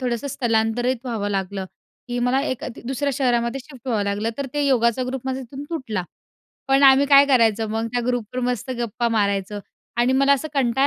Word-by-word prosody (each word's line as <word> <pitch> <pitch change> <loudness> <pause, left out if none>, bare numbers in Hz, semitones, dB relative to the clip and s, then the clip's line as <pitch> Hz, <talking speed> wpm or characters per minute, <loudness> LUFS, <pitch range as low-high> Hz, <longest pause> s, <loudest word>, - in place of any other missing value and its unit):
थोडंसं 245 +1 -2
स्थलांतरित 240 +1 0
व्हावं 225 -5 -2
लागलं, 195 0 -2 0.4
की 245 0 -2
मला 250 +2 +2
एका 260 -4 -3
ती - - -10
दुसऱ्या 275 +2 -1
शहरामध्ये 245 -1 0
शिफ्ट 265 -5 -15
व्हावं 220 -4 +1
लागलं. 205 +3 -1
तर 280 - -2
ते 290 -1 +1
योगाचा 240 -2 +2
ग्रुप 260 +1 -3
माझा 265 0 -2
तिथून 265 +2 -8
तुटला. 230 - -3 0.7
पण 270 +1 +4
आम्ही 270 +1 +7
काय 280 0 +7
करायचं 225 -5 +3
मग 225 +1 -1
त्या 245 - +1
ग्रुपवर 245 0 -2
मस्त 250 0 -2
गप्पा 235 0 -1
मारायचं 205 -2 0 0.4
आणि 240 +2 +3
मला 275 +1 +4
असं 280 +3 0
कंटाळा 265 0 +2
245 Hz, 190 wpm, -22 LUFS, 225-265 Hz, 0.7 s, आम्ही